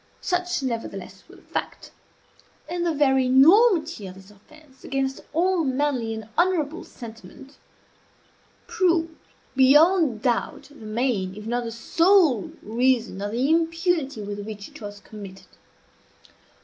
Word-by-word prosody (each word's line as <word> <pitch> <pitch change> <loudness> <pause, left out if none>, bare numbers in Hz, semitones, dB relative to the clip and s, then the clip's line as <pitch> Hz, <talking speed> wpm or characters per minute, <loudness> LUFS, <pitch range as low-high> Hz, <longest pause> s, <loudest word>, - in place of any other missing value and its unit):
Such, 360 -4 -1
nevertheless, 235 -3 -5
was - - -16
the - - -21
fact. - - -5 0.8
And 345 +2 -3
the 340 - +1
very 265 -4 +2
enormity 320 - +4
of 185 - -10
this 190 +1 -15
offence 270 +6 -20
against 270 0 -2
all 350 +2 +1
manly 260 -4 -1
and 220 -1 -8
honorable 345 -3 +1
sentiment 230 +3 -12 1.1
proved, 335 -3 +1 0.4
beyond 285 - +4
doubt, 245 +1 -1
the 245 -7 -12
main 215 -5 -1
if 210 0 -9
not 240 +1 -2
the 230 - -4
sole 325 - +3
reason 235 -2 0
of 205 0 -3
the 245 +4 0
impunity 330 - 0
with 205 0 -6
which 205 -1 -8
it - - -14
was 205 -1 -8
committed. 200 -3 -11
265 Hz, 130 wpm, -24 LUFS, 220-330 Hz, 1.1 s, enormity